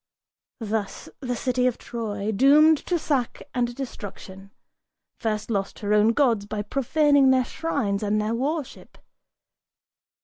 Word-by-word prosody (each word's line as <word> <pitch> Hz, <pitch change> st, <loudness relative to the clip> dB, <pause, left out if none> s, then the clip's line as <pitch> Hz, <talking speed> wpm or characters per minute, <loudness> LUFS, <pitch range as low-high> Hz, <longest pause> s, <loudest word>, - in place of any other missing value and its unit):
Thus 220 Hz, -2 st, -4 dB
the 245 Hz, -3 st, -3 dB
city 250 Hz, +1 st, 0 dB
of 250 Hz, -, -1 dB
Troy, 215 Hz, -3 st, -4 dB
doomed 290 Hz, +7 st, +5 dB
to 355 Hz, -, +1 dB
sack 275 Hz, -7 st, -2 dB
and 240 Hz, -1 st, -1 dB
destruction, 195 Hz, -6 st, -8 dB, 0.7 s
First 215 Hz, 0 st, -2 dB
lost 195 Hz, -2 st, -2 dB
her 205 Hz, 0 st, -1 dB
own 210 Hz, +2 st, +4 dB
gods 230 Hz, -7 st, +2 dB
by 210 Hz, 0 st, -3 dB
profaning 280 Hz, +4 st, +3 dB
their 260 Hz, -1 st, +3 dB
shrines 245 Hz, -13 st, -2 dB
and 210 Hz, 0 st, 0 dB
their 215 Hz, +1 st, -1 dB
worship. 285 Hz, +4 st, -4 dB
235 Hz, 130 wpm, -24 LUFS, 210-275 Hz, 0.7 s, doomed